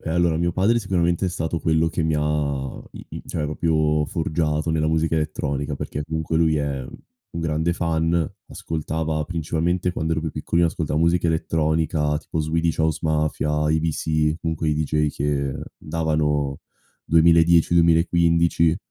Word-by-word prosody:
Eh 80 - -5
allora 85 -1 +2
mio 85 +1 0
padre 105 +7 +2
sicuramente 90 -3 0
è - - 0
stato 85 -2 -2
quello 80 0 +2
che 80 0 -2
mi 80 -1 +1
ha 75 -3 -1
i - - -10
i - - -8
cioè 80 - -3
proprio 75 -1 +1
forgiato 80 -1 -1
nella 80 -1 +1
musica 80 +1 +1
elettronica, 75 -1 -2
perché 75 +1 -5
comunque 80 +1 -2
lui 80 -1 +3
è 70 -3 -2
un 85 - -11
grande 80 +1 0
fan, 80 -1 0 0.3
ascoltava 80 0 -3
principalmente 85 +2 -1
quando 80 -2 -2
ero 80 - 0
più 80 0 -3
piccolino 85 +3 +1
ascoltava 80 -1 -2
musica 85 +1 +2
elettronica, 80 -2 0
tipo 80 - -5
Swedish 80 +2 0
House 80 -1 +1
Mafia, 75 -1 0
IBC, 80 -1 0
comunque 80 -1 -2
i 75 - +2
DJ 75 0 0
che 70 -1 -1 0.2
davano 75 -3 -1 0.4
2010-2015. 85 0 +4
80 Hz, 145 wpm, -23 LUFS, 75-85 Hz, 0.4 s, 2010-2015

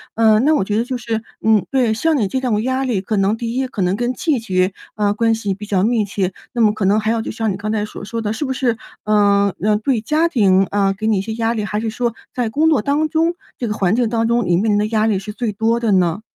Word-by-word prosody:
嗯， 220 +1 +4
那 310 +1 +4
我 290 - +1
觉 205 +2 -1
得 230 - 0
就 255 0 -3
是 225 -1 -3 0.2
嗯， 215 -4 +4
对， 250 -5 +2
像 315 +7 +1
你 210 -7 0
这 260 - -1
种 230 -4 0
压 260 +1 -1
力 225 -7 0
可 210 +2 -2
能 195 +2 +2
第 230 +1 -4
一， 265 0 0
可 235 -5 -5
能 180 +2 +1
跟 245 +2 -1
季 310 -3 0
节， 185 -3 0 0.2
啊， 205 -1 +1
关 225 +2 +1
系 205 -3 -2
比 200 +2 -8
较 200 -3 0
密 225 -1 +2
切， 195 -2 -2 0.2
那 240 - 0
么 215 -2 +5
可 210 -2 -2
能 205 +3 +3
还 215 - -1
有 230 - 0
就 - - -4
像 225 -1 -1
你 190 - -4
刚 215 +2 -3
才 215 -1 0
所 210 - -9
说 230 +2 -4
的， 210 -1 -2
是 290 - -3
不 265 - -2
是， 245 -4 0 0.3
嗯， 200 -1 +3
呃， 210 +1 +2
对， 235 +1 0
家 305 +9 +1
庭， 195 - +3
嗯， 195 -1 +2
给 215 +2 -3
你 220 -2 +2
一 - - 0
些 220 +3 -5
压 225 0 0
力？ 215 - -2
还 210 +1 -2
是 225 0 -2
说 235 +1 -2 0.2
在 240 -3 -1
工 310 +7 +2
作 300 -8 +3
当 290 +4 +1
中 325 +2 +1 0.2
这 240 - -3
个 210 - -1
环 195 -1 +1
境 240 -1 +1
当 230 0 0
中， 235 -1 +1
你 175 -1 +3
面 215 +4 +1
临 205 - +3
的 210 - +1
压 215 -1 +1
力 210 -3 +1
是 195 +2 -6
最 230 0 -2
多 225 +3 0
的 230 -3 0
呢？ 180 +1 +1
220 Hz, 310 characters per minute, -19 LUFS, 205-240 Hz, 0.3 s, 么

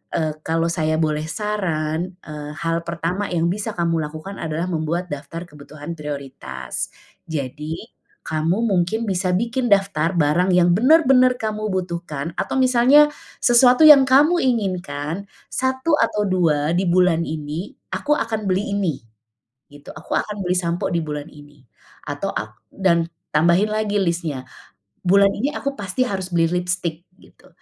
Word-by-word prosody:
eee, 155 -1 0
kalau 165 +1 0
saya 155 -2 0
boleh 155 -1 0
saran, 175 -3 -2
eee, 150 -1 -7
hal 165 0 0
pertama 170 +4 -2
yang 170 -1 +1
bisa 210 +3 -3
kamu 165 -2 0
lakukan 155 +6 -7
adalah 160 +2 -3
membuat 165 +2 -2
daftar 145 +4 -6
kebutuhan 150 +1 -9
prioritas, 145 -3 -6 0.4
jadi, 150 +2 -4 0.5
kamu 160 +4 0
mungkin 205 +2 0
bisa 185 0 0
bikin 235 +3 -1
daftar 195 -6 +2
barang 165 +5 +2
yang 175 -1 +4
benar-benar 255 -1 +5
kamu 215 -1 -2
butuhkan 170 -5 -4
atau - - -2
misalnya, 260 +3 +6 0.4
sesuatu 250 +3 +6
yang 290 -2 +10
kamu 300 +7 +5
inginkan, 185 - -2 0.2
1 260 +4 0
atau 210 -4 +1
2 165 -5 +1
di 185 +2 +1
bulan 180 -2 +3
ini 155 +4 -5 0.2
aku 295 - +1
akan 220 -2 -2
beli 200 +2 0
ini, 180 -7 0 0.8
gitu 145 0 -14
aku - - -7
akan 210 -1 -3
beli 180 - +1
sampo 170 -1 -1
di 170 - +1
bulan 150 -1 -5
ini 145 0 -16 0.5
atau - - -3
ak - - -7
dan 170 -4 +1 0.2
tambahin 170 +7 +3
lagi 215 -1 0
listnya, 165 -7 -2 0.6
bulan 195 +2 +5
ini 270 +7 -1
aku 280 - -2
pasti 205 +3 -1
harus 195 -7 -3
beli 165 -1 +3
lipstik 175 -2 -3
gitu - - -21
175 Hz, 145 wpm, -21 LUFS, 155-210 Hz, 0.8 s, yang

